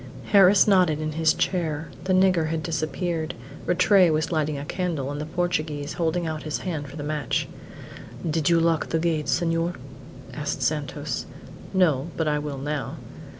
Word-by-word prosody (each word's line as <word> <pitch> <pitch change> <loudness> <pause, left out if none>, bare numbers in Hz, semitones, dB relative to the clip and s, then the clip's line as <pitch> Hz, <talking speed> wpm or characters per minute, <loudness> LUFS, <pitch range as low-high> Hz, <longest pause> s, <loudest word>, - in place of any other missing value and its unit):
Harris 200 -1 +7
nodded 180 -6 +4
in 155 0 -2
his 160 +1 +3
chair. 160 -4 -1 0.2
The 185 - +2
nigger 185 -3 +4
had 160 0 -2
disappeared. 160 0 -2 0.3
Rattray 185 +1 +5
was 155 +1 0
lighting 155 -2 0
a 140 - -5
candle, 160 -5 -2
and 145 +1 -4
the 150 - -5
Portuguese 155 -4 -2
holding 170 +1 0
out 155 -1 -3
his 155 -1 -3
hand 155 -6 -3
for 140 - -11
the 150 - -5
match. 150 -3 -1 0.8
"Did 160 0 +1
you 170 -1 +5
lock 165 -1 +1
the 165 - +1
gate, 160 -2 0
senhor?" 165 0 +1 0.6
asked - - -3
Santos. - - -2 0.4
"No; 165 -7 +2
but 160 - 0
I 150 0 +1
will 145 -2 -4
now." 145 +1 -3
160 Hz, 165 wpm, -25 LUFS, 150-175 Hz, 0.8 s, Harris